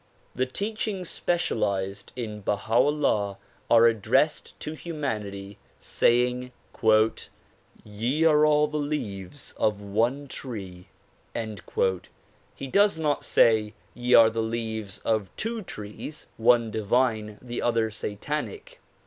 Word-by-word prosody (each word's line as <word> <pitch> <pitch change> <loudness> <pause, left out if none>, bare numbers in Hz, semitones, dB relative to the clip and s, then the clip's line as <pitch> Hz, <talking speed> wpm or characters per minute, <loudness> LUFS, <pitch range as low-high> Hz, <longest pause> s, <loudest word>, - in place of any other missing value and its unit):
The 130 +1 0
teachings 200 - -3
specialized 100 - -1
in 110 -4 -5
Baha 105 +2 -2
'Ullah 120 -7 +2 0.3
are 115 0 +7
addressed 115 +7 +1
to 155 - -4
humanity, 105 - -5 0.2
saying 125 +1 +1 1.3
"Ye 120 +9 -1
are 150 -2 +5
all 150 0 +5
the 150 0 -3
leaves 145 -6 -4
of 105 -1 +1
one 115 +8 0
tree." 95 -10 -7 1.7
He - - -6
does 200 +5 +3
not 150 -3 0
say 110 -2 +3 0.2
"Ye 125 0 +2
are 115 -1 +8
the 115 0 -1
leaves 110 -3 -3
of 110 -4 +1
two 225 +1 -3
trees, 105 - -7
— - - -37
one 115 -1 +3
divine, 110 -1 0
the 120 -1 -5
other 115 -2 +1
satanic." 150 - -5
115 Hz, 115 wpm, -26 LUFS, 105-150 Hz, 1.7 s, are